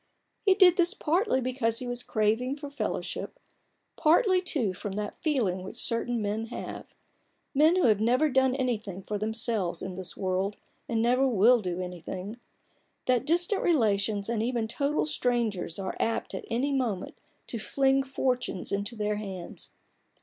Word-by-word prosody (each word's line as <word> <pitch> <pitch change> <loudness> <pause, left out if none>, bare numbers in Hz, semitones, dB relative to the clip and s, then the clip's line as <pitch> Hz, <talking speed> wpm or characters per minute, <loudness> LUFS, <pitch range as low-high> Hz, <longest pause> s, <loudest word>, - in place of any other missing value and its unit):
He 390 -2 +5
did 370 -3 +6
this 350 +3 +3
partly 335 - +1
because 245 -3 0
he 255 - -3
was 245 0 -3
craving 225 +4 0
for 290 -1 -8
fellowship; 285 +10 -4 0.6
partly, 365 +4 +4
too, 270 - 0
from 195 +2 -6
that 205 +1 -5
feeling 230 - 0
which 185 - -8
certain 230 0 0
men 210 +2 -1
have 240 - -7 0.3
— - - -45
men 310 +5 +5
who 370 - +2
have 215 -3 +4
never 250 +7 +3
done 265 -2 +2
anything 215 -8 -2
for 210 +1 -3
themselves 215 -5 -1
in 190 - -4
this 185 -1 -5
world, 190 +2 -1 0.3
and 225 -1 +1
never 250 +3 +3
will 235 +1 +5
do 180 -2 -3
anything— 180 +4 -6 0.7
that 250 -2 +1
distant 350 +5 +2
relations, 210 - +1
and 230 -2 -1
even 235 -1 -1
total 280 +6 0
strangers, 235 - -1
are 195 -1 -4
apt 225 - -1
at - - -5
any 250 +5 0
moment 230 -9 -2 0.3
to 230 - -5
fling 270 +4 +2
fortunes 255 -6 -2
into 200 +3 -2
their 210 -1 -1
hands. 190 -4 -7
235 Hz, 160 wpm, -28 LUFS, 205-270 Hz, 0.7 s, did